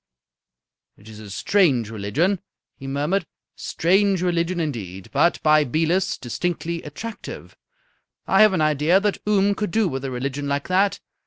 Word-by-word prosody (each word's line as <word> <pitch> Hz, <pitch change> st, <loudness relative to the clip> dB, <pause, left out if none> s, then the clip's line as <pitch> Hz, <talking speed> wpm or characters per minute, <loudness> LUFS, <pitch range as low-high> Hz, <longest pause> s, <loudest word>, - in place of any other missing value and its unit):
"It 105 Hz, -, -18 dB
is 110 Hz, -1 st, -11 dB
a 105 Hz, -2 st, -10 dB
strange 130 Hz, -, +2 dB
religion," 115 Hz, -, 0 dB, 0.4 s
he 135 Hz, -, -10 dB
murmured. 145 Hz, +8 st, 0 dB
"A -, -, -22 dB, 0.3 s
strange 190 Hz, +2 st, +1 dB
religion, 175 Hz, 0 st, 0 dB
indeed. 100 Hz, -, -5 dB
But, 155 Hz, +5 st, +2 dB
by 155 Hz, 0 st, +5 dB
Belus, 165 Hz, +7 st, 0 dB
distinctly 170 Hz, +6 st, -3 dB
attractive. 205 Hz, +9 st, -8 dB, 0.7 s
I 195 Hz, +2 st, +4 dB
have 215 Hz, -2 st, +6 dB
an 175 Hz, -, +1 dB
idea 155 Hz, +4 st, +3 dB
that 205 Hz, 0 st, -1 dB
Oom 200 Hz, -1 st, +3 dB
could 210 Hz, 0 st, -3 dB
do 220 Hz, +2 st, +1 dB
with 135 Hz, -5 st, -4 dB
a 135 Hz, -, -3 dB
religion 135 Hz, +3 st, -3 dB
like 140 Hz, 0 st, -2 dB
that. 195 Hz, +2 st, +2 dB
165 Hz, 155 wpm, -22 LUFS, 135-190 Hz, 0.7 s, have